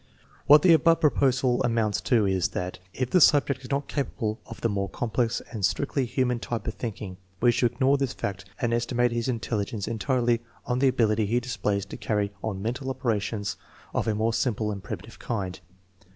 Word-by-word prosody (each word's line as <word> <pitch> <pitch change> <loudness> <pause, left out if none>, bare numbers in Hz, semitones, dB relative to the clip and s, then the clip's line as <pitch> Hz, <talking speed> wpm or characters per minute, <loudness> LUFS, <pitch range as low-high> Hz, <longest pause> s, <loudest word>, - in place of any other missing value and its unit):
What 150 +1 +8
the 175 - +7
above 165 +1 +4
proposal 130 -5 +2
amounts 115 -4 +1
to 115 -5 +4
is, 95 -2 +1
that 90 0 -4
if 130 +3 -3
the 180 - +5
subject 140 -3 +4
is 125 - -9
not 140 0 -1
capable 115 -6 -2
of 115 - -9
the - - +2
more 100 -2 -2
complex 120 +2 -1
and 110 -4 -5
strictly 135 +7 +1
human 125 -1 0
type 115 -2 -4
of 110 - -2
thinking, 105 -5 -6 0.2
we 120 - +5
should 120 0 +1
ignore 135 +3 +3
this 135 -2 0
fact 95 -1 -4
and 120 -1 0
estimate 120 +1 +1
his 120 0 -1
intelligence 110 -4 -2
entirely 120 0 +1 0.2
on 125 0 0
the 135 - +4
ability 110 -4 +2
he 120 +4 +2
displays 105 -5 -2
to - - -8
carry 105 -2 -1
on 100 -3 -3
mental 130 +4 -3
operations 105 -5 -2 0.4
of - - -1
a 110 - +1
more 110 +2 +1
simple 110 -3 0
and 100 -1 -5
primitive 100 +3 -8
kind. 95 -6 -3
115 Hz, 190 wpm, -26 LUFS, 105-130 Hz, 0.4 s, What